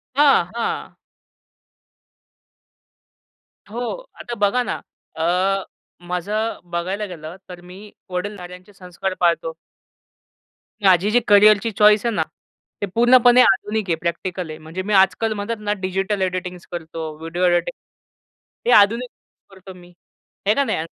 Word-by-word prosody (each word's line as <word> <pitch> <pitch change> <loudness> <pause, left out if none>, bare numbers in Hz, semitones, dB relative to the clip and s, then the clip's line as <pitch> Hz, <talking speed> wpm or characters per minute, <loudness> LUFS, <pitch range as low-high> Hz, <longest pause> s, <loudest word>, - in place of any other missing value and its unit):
हां, 280 -10 +5
हां. 235 - -3 2.7
हो, 225 +3 -6 0.4
आता 240 - -6
बघा 205 +5 +2
ना, - - -4 0.3
अ, 185 +4 +1 0.4
माझं 205 +6 -2
बघायला 185 +5 -2
गेलं 165 -3 -9
तर 180 -1 -10
मी 180 +2 -12 0.3
वडीलधाऱ्यांचे 180 0 -6
संस्कार 185 0 -5
पाळतो. 180 - +1 1.3
माझी 190 +1 +4
जी 245 - +4
करियरची 210 +2 +5
चॉईस 210 +1 +5
आहे 235 - +1
ना, - - +1 0.6
ते - - +1
पूर्णपणे 245 +1 +6
आधुनिक 210 +1 +1
आहे, 165 - +2
प्रॅक्टिकल 175 0 -3
आहे. 155 - -7
म्हणजे 160 +4 -6
मी 210 +3 -3
आजकाल 195 +3 +3
म्हणत 210 +2 -3
ना 210 -1 -1
डिजिटल 190 +2 -2
एडिटिंग्स 180 -1 -3
करतो, 160 -2 -6
व्हिडिओ 165 +3 -4
एडिटिंग, 175 +7 +1 0.9
हे - - +5
आधुनिक 235 +5 0 0.4
करतो 190 -1 -13
मी. 180 -1 -16 0.5
आहे 210 - +4
का 280 - +2
नाही? 260 - -1
190 Hz, 125 wpm, -21 LUFS, 180-210 Hz, 2.7 s, पूर्णपणे